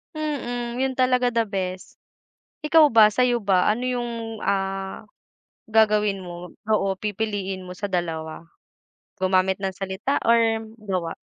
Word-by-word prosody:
Mm. 245 -5 -3
Yun 265 0 0
talaga 255 -1 +3
the 230 -1 +1
best. 185 -2 -4 0.7
Ikaw 310 -1 +6
ba 220 -2 +7
sa'yo 245 0 +2
ba 185 -2 +3
ano 240 +4 -1
yung, 245 -1 -2 0.3
ah, 195 0 -2 0.6
gagawin 210 -2 +3
mo 175 0 -8 0.2
oo 205 -2 +2
pipiliin 205 -3 -3
mo 180 0 -9
sa 205 - -3
dalawa? 165 -2 -3 0.7
Gumamit 185 0 +2
ng 190 -1 -2
salita 195 +8 -2
or 235 0 +5 0.4
gawa? 185 -5 -3
205 Hz, 125 wpm, -24 LUFS, 185-240 Hz, 0.7 s, ba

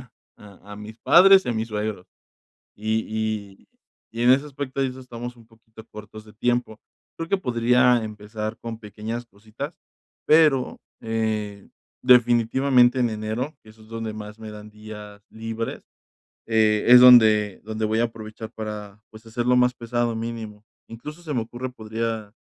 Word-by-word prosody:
visitar - - -15 0.3
a 100 -2 -16
a - - -8
mis 110 +2 -10
padres 190 +7 +7
y - - -3
a - - +1
mis 110 +1 -3
suegros. 105 -3 -4 0.7
Y 110 +1 -1
y 110 -3 -4 0.5
y 115 - -2
en 125 - +5
ese 140 +3 +4
aspecto 140 -1 -5
de 135 - +2
eso 130 +1 -9
estamos 120 -1 -8
un 115 -1 -18
poquito 110 -1 -17
cortos 105 0 -11
de 105 - -16
tiempo. 120 0 -1 0.4
Creo 165 0 -4
que 195 - +2
podría 125 -2 +3
empezar 105 0 -6
con 115 -1 -7
pequeñas 110 +3 -6
cositas, 110 - -9 0.5
pero, 150 -5 +3 0.2
eh, 110 -3 -3 0.4
definitivamente 125 +1 +4
en 120 -2 +2
enero, 110 +7 -4
eso 110 0 -17
es 110 - -18
donde 115 -1 -5
más 105 0 -9
me 110 -1 -9
dan 105 0 -11
días 105 -1 -11
libres, 115 +1 -5 0.6
eh, 110 -2 +2
es 125 0 +10
donde 110 -5 +6
donde 110 0 -3
voy 110 +1 0
a 120 - +3
aprovechar 110 0 -9
para, 105 -2 -7
pues, 110 +1 -15
hacer 115 +2 -3
lo 125 0 +4
más 125 0 +3
pesado 120 -1 -2
mínimo. 110 -2 -6 0.2
Incluso 150 +9 -9
se 155 -4 -5
me 120 - 0
ocurre, 120 +3 -6
podría, 110 -2 -4
110 Hz, 165 wpm, -23 LUFS, 110-125 Hz, 0.7 s, es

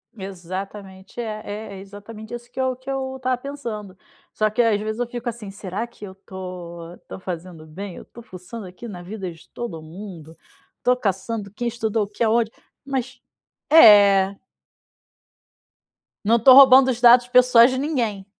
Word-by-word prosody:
Exatamente 190 +1 -8
é 215 -2 -4
é 210 +2 -6
é 190 - -9
exatamente 210 +3 -11
isso 240 0 -8
que 265 - -8
eu 260 -1 0
que 260 +2 -11
eu 265 -1 -3
estava 255 -1 -1
pensando. 235 -8 -7 0.4
Só 215 0 +1
que 215 +3 +1
às 225 -3 +2
vezes 215 +2 -4
eu 245 - -1
fico 240 0 -7
assim 215 -4 -8
será 200 +2 -5
que 225 -3 -12
eu 190 -1 -11
tô 180 -3 -9
tô - - -8
fazendo 175 -3 -7
bem? 185 +4 -8
Eu - - -11
tô 235 - -14
fuçando 190 +1 -10
aqui 185 +6 -10
na 180 -5 -8
vida 190 0 -6
de 165 -1 -17
todo 190 -10 -7
mundo. 165 -1 -11 0.4
Estou 250 - +2
caçando 205 -1 -3
quem 240 +3 -4
estudou 225 -2 -1
o - - -5
que 205 +3 -3
aonde, 225 0 +2 0.3
mas 265 -1 -4 0.5
é. 200 -8 +7 1.9
Não 225 +3 +4
estou 255 +3 +7
roubando 265 -1 +8
os 240 - -4
dados 245 0 +7
pessoais 250 -1 +6
de 260 - -2
ninguém. 240 -9 -2
215 Hz, 170 wpm, -22 LUFS, 190-240 Hz, 1.9 s, roubando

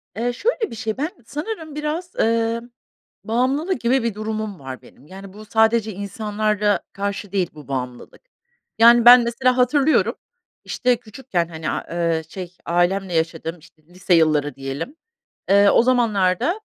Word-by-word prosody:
Eee, 240 +2 -1
şöyle 445 - -1
bir - - -7
şey, 220 0 -4
ben 305 +4 -1 0.2
sanırım 315 - -6
biraz, 315 +4 -4
eee, 230 +1 +1 0.6
bağımlılık 270 - 0
gibi 245 +1 +2
bir 230 -3 -1
durumum 215 -3 -4
var 130 -1 -8
benim. 145 - -19
Yani, 195 +1 -11
bu 215 +1 -12
sadece 220 0 +2
insanlara 210 +1 -1
karşı 200 0 -4
değil 190 -4 0
bu 150 -2 -13
bağımlılık. 125 -2 -6 0.6
Yani, 235 +1 +7
ben 245 0 +10
mesela 250 +2 +1
hatırlıyorum, 280 +4 +3 0.5
işte, 250 -1 +1
küçükken, 215 -7 -3
hani, 160 -2 -5
a - - -2
eee, 170 -2 0
şey, 180 -2 -8
ailemle 175 +2 0
yaşadığım, 165 +1 -2
işte, 155 0 -22
lise 180 +1 -1
yılları 150 -4 +2
diyelim, 135 - -6 0.6
eee, 200 0 +6
o - - +5
zamanlarda, 240 - +1
215 Hz, 145 wpm, -21 LUFS, 175-245 Hz, 0.6 s, ben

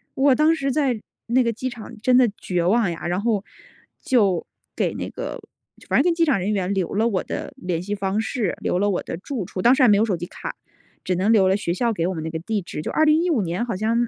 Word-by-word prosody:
我 270 -1 +4
当 310 +3 +4
时 275 -3 -1
在 260 -5 +1 0.3
那 250 +2 +3
个 235 - +1
机 255 +4 -3
场 240 -1 -9
真 250 +2 +4
的 250 -2 +5
绝 180 -2 -1
望 200 +1 +2
呀， 170 0 -5
然 180 +2 -1
后 215 -3 0 0.6
就 200 - +2 0.3
给 - - 0
那 - - -5
个 - - -6 0.5
反 - - +2
正 - - +5
跟 350 - +3
机 335 -1 +3
场 285 -10 +2
人 190 +3 -1
员 195 -2 0
留 190 -4 -1
了 220 +3 +2
我 200 -5 0
的 - - -5
联 175 -2 -2
系 205 +3 -3
方 195 +1 -1
式， 220 -3 -1
留 180 - 0
了 205 +1 +2
我 190 - -1
的 - - -5
住 210 +2 -4
处， 185 - -5
当 240 +6 +6
时 265 - +3
还 - - +7
没 205 - +6
有 215 - +3
手 200 -6 -1
机 175 - -5
卡， - - -7 0.5
只 185 - 0
能 190 +5 +2
留 200 -4 +5
了 190 - +3
学 170 -4 -2
校 235 +4 0
给 170 -4 -1
我 190 - -1
们 160 -3 -5
那 160 - -3
个 160 0 -4
地 210 +5 -2
址， 170 - -6
就 - - -4
2015 315 -3 +3
年 180 +5 -2
好 230 - -3
像 230 +4 +1
210 Hz, 275 characters per minute, -23 LUFS, 185-245 Hz, 0.6 s, 还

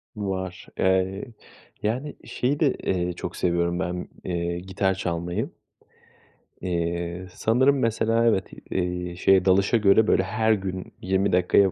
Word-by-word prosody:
Var, 95 -3 -4
eee, 95 +1 +2 0.6
yani, 125 +7 -2
şeyi 140 +4 -1
de, 150 -5 +3
eee, 90 -1 0
çok - - -6
seviyorum 85 0 0
ben, 90 -1 -3 0.2
eee, 85 -1 -2
gitar 95 +1 0
çalmayı. 85 -2 -2 1.1
Eee, 85 0 -2
sanırım 130 +7 +3
mesela 115 0 +2
evet, 110 -5 +2 0.2
eee, 90 -1 -2
şeye 95 +1 +4
dalışa 100 +5 +4
göre 105 +1 +5
böyle 95 - +3
her 110 +3 +2
gün 95 -2 -4
20 95 +2 +1
dakikaya 90 +2 +4
95 Hz, 130 wpm, -25 LUFS, 90-110 Hz, 1.1 s, göre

